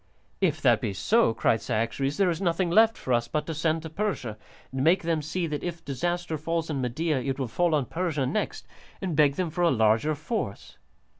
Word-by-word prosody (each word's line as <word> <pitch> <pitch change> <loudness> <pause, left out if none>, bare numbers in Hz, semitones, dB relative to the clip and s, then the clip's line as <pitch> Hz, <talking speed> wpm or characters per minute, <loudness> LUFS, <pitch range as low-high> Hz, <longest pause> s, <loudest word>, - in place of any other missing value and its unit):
"If - - +2
that - - +4
be 100 - -2
so," 215 - +3
cried 115 - +2
Cyaxares, 125 +6 -1
"there 195 -3 +3
is 165 - -4
nothing 175 -1 +1
left 225 +4 +5
for 130 - -2
us 120 0 +1
but 150 +4 -2
to 160 - -4
send 160 +1 0
to 160 - -6
Persia, 160 - -2 0.4
and 130 0 -2
make 175 +4 +4
them 165 -2 0
see 170 +4 -2
that 150 -2 -3
if 170 -2 -5
disaster 175 +3 -2
falls 165 +1 -2
on 140 -3 -2
Media 140 +4 0
it 135 +1 -2
will 135 -3 -2
fall 170 +7 +1
on 145 -3 +1
Persia 160 -3 -1
next, 160 +12 -2 0.3
and 185 -5 -3
beg 145 -2 +4
them 175 -1 -2
for 175 - -3
a 175 - +5
larger 115 +4 +2
force." 155 - -5
155 Hz, 215 wpm, -27 LUFS, 135-175 Hz, 0.4 s, left